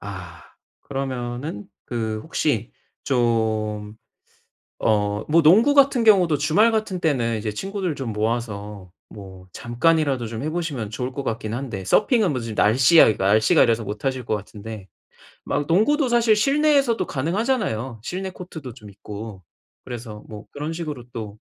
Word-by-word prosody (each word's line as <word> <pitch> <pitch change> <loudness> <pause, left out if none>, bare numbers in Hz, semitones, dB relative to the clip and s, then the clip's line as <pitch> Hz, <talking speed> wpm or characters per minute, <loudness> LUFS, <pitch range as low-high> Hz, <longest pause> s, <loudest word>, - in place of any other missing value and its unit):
아 95 -3 -9 0.4
그러면은 125 -3 -5 0.2
그 110 -3 -3
혹시 135 -8 -1 0.3
좀 110 -4 0 0.8
어 105 -1 +1
뭐 165 +2 +4
농구 220 - +6
같은 275 -4 +4
경우도 180 -8 +5
주말 160 +11 +3
같은 215 -5 -2
때는 125 -8 +1
이제 110 0 -3
친구들 190 - -3
좀 125 -5 -4
모아서 105 -4 -3 0.2
뭐 95 -2 -12
잠깐이라도 135 - +1
좀 115 +1 -6
해 155 - -1
보시면 155 -10 -3
좋을 125 +4 -4
것 140 +1 -5
같긴 110 -2 -3
한데 120 -6 -5
서핑은 210 - +3
무슨 115 -4 -4
날씨가, 125 +4 +5
날씨가 105 +3 +4
이래서 115 -1 +1
못 105 +2 -6
하실 130 -2 -1
것 110 - 0
같은데 105 0 -9 0.6
막 145 0 -1
농구도 255 - +3
사실 235 -2 +4
실내에서도 275 0 +2
가능하잖아요. 155 - -1
실내 190 +8 -4
코트도 160 -8 -9
좀 110 -3 -13
있고 100 0 -9 0.4
그래서 115 -4 -8
뭐 105 -1 -9
그런 150 +3 -5
식으로 155 -7 -5
또 110 -2 -7
125 Hz, 300 characters per minute, -23 LUFS, 110-170 Hz, 0.8 s, 농구